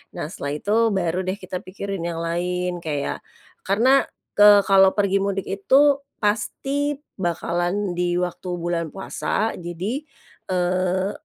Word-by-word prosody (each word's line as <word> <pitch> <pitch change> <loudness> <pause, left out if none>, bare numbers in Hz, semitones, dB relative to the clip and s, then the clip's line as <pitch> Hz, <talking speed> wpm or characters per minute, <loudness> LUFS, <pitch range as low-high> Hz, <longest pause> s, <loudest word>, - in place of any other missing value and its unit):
Nah, - - -3
setelah 145 -6 -4
itu, 205 +8 -1 0.2
baru 175 -1 0
deh, 185 - 0
kita 185 -2 -6
pikirin 195 +1 -6
yang 165 -1 -3
lain, 180 +1 -2
kayak 150 -4 -3 0.5
karena, 245 +8 +4 0.3
ke 205 -1 +8
kalau 195 -1 +6
pergi 200 -1 +1
mudik 195 -1 -2
itu, 275 +9 +4 0.2
pasti 270 +8 -1 0.2
bakalan 175 +1 -1
di 175 0 0
waktu 180 +1 -3
bulan 170 -1 -2
puasa. 215 +3 -2
Jadi, 180 - -4 0.4
eee 185 +1 0
185 Hz, 130 wpm, -23 LUFS, 175-205 Hz, 0.5 s, ke